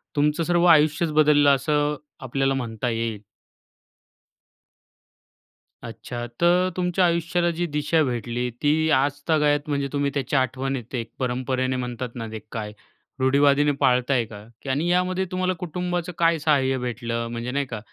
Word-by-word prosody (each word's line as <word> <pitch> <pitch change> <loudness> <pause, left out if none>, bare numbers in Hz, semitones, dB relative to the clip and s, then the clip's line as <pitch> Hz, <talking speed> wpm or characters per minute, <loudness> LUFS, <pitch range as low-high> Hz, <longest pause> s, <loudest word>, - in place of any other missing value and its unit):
तुमचं 150 +3 +2
सर्व 175 +1 +2
आयुष्यच 155 +1 +2
बदललं, 150 -1 +5
असं 145 +2 0 0.3
आपल्याला 135 +1 0
म्हणता 120 -2 -3
येईल. 115 -2 -2 2.6
अच्छा. 120 +1 -6 0.2
तर 180 +2 +4
तुमच्या 180 0 +2
आयुष्याला 170 +1 +1
जी 175 - 0
दिशा 150 +2 +1
भेटली, 120 -1 -2
ती 155 +2 +2
आजतागायत 145 +2 +1
म्हणजे 140 -1 0
तुम्ही 140 -1 0
त्याच्या 140 0 0
आठवणीत 130 -1 -3
एक 115 -2 -4
परंपरेने 130 0 -1
म्हणतात 125 -1 -5
ना, 115 -2 -5
ते 110 - -5
काय 105 -2 -5 0.5
रुढी-वादीने 140 +2 +4
पाळताय 125 -1 +2
का? 105 -1 -11 0.2
की 140 - -7
आणि 145 +6 0
यामध्ये 180 +1 +1
तुम्हाला 185 0 0
कुटुंबाचं 180 0 -3
काय 165 -1 +3
सहाय्य 140 -3 +2
भेटलं? 120 -1 -3
म्हणजे 120 +1 -4
नाही 140 +1 -1
का? 115 -4 -6
140 Hz, 135 wpm, -24 LUFS, 125-160 Hz, 2.6 s, बदललं